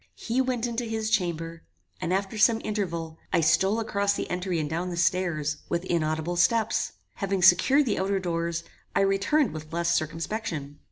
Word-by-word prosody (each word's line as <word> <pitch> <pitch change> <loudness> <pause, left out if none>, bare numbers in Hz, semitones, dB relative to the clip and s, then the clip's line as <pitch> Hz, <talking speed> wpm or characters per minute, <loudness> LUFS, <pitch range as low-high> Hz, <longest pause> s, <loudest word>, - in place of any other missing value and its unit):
He 230 - -1
went 250 -2 -1
into 240 0 -2
his 220 -1 -2
chamber, 165 -5 -1 0.4
and - - -2
after 195 +3 -1
some 225 +1 +4
interval, 170 -7 -3
I 170 - +3
stole 190 +7 +3
across 200 -2 0
the - - -3
entry 180 0 -1
and 155 -2 -1
down 170 +4 -2
the 175 - -5
stairs, 170 -4 +1
with 170 +1 -1
inaudible 160 0 -1
steps. 225 +4 +2 0.2
Having 195 -3 -1
secured 265 +13 +6
the 215 - 0
outer 195 +1 +1
doors, 170 -2 -2 0.3
I - - +4
returned 195 +8 +2
with 155 0 -8
less 170 0 +1
circumspection. 160 -2 -3
180 Hz, 170 wpm, -27 LUFS, 165-215 Hz, 0.4 s, secured